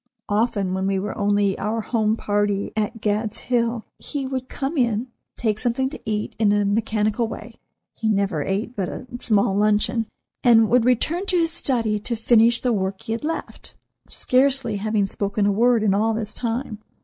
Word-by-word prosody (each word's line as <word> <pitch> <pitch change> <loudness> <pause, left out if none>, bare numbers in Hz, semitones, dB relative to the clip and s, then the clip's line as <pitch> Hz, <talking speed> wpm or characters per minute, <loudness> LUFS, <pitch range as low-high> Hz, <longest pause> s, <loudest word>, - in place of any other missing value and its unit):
Often, 205 -3 0
when 190 0 -1
we 195 0 +1
were 195 +1 -3
only 205 -1 +1
our 225 +2 -1
home 220 -1 +1
party 205 -1 -1
at 215 +1 -2
"Gad's 215 +1 -1
Hill," 235 -2 -1
he 285 -2 -4
would 260 -1 -4
come 275 +4 -3
in, 240 -2 0 0.3
take 215 -3 0
something 260 +3 0
to - - -9
eat 210 -1 -2
in 210 -2 +4
a 205 0 +2
mechanical 215 +2 0
way—he 225 0 -7
never 195 -6 +1
ate 200 - -2
but 190 -3 -2
a - - -7
small 200 -4 +2
luncheon—and 220 +2 +2
would 240 0 +4
return 315 - +1
to 365 - +2
his 330 -1 +1
study 230 -9 0
to 235 +3 -2
finish 230 +1 +4
the 250 -2 +1
work 190 -1 -2
he 225 - -6
had 225 +4 -2
left, 325 +2 -5 0.3
scarcely 255 -4 +2
having 210 0 0
spoken 200 +1 -1
a 205 - +3
word 230 +2 +3
in 200 -3 +3
all 220 +2 +1
this 215 -1 -4
time. 230 -2 -3
220 Hz, 175 wpm, -23 LUFS, 205-240 Hz, 0.3 s, in